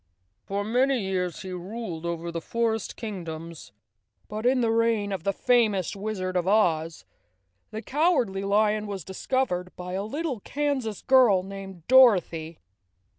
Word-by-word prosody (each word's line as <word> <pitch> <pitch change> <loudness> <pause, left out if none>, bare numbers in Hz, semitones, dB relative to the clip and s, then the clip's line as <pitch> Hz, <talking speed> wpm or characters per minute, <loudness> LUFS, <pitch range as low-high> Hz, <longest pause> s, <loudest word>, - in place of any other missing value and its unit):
For 200 +1 -2
many 255 +4 +2
years 185 -3 -2
he 190 - -6
ruled 180 -2 -5
over 170 0 -3
the 165 0 -4
forest 225 +3 -1
kingdoms, 165 - -7 0.6
but 215 +3 -2
in 255 0 +3
the 230 -1 +2
reign 225 -3 +1
of 190 -4 -3
the 200 - +2
famous 210 -5 +2
Wizard 195 -3 -3
of 180 0 0
Oz 165 -6 +1 0.6
the 220 +1 -6
Cowardly 270 - +1
Lion 210 +1 +2
was 195 -4 -5
discovered 190 -3 -2
by 180 0 -7
a 190 - -1
little 280 +3 -3
Kansas 270 -4 -2
girl 245 -8 +5
named 195 -3 -9
Dorothy. 180 -11 +4
200 Hz, 140 wpm, -26 LUFS, 180-230 Hz, 0.6 s, girl